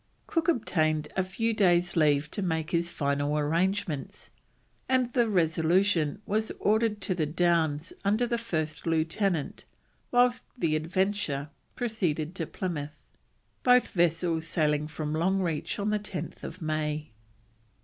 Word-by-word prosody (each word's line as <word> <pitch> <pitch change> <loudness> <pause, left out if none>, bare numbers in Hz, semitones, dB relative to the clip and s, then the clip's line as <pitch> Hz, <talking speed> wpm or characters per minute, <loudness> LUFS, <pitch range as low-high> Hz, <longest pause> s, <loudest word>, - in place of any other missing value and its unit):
Cook 330 0 -1
obtained 155 - +1
a 190 - +2
few 225 +5 -1
days' 175 -4 +3
leave 150 -2 +3
to - - -2
make 160 -3 -1
his 170 0 +1
final 145 -1 0
arrangements, 165 0 -1 0.6
and 255 -2 +2
the 240 -3 +3
Resolution 170 0 +2
was 220 +2 0
ordered 215 0 +1
to 185 0 0
the 160 -4 -1
Downs 165 -1 +1
under 210 +5 +2
the 235 -1 -1
first 160 -8 -3
lieutenant, 165 +1 0 0.5
whilst 245 0 +3 0.2
the 165 -9 +1
Adventure 165 -3 -1 0.3
proceeded 180 -9 -1
to 165 -4 -3
Plymouth; 150 - -5 0.5
both 250 0 +5
vessels 165 -1 +1
sailing 150 -3 +1
from 155 -1 -4
Longreach 170 -1 0
on 205 +1 -1
10th 205 -3 -5
May. 155 -1 -2
170 Hz, 125 wpm, -28 LUFS, 155-205 Hz, 0.6 s, both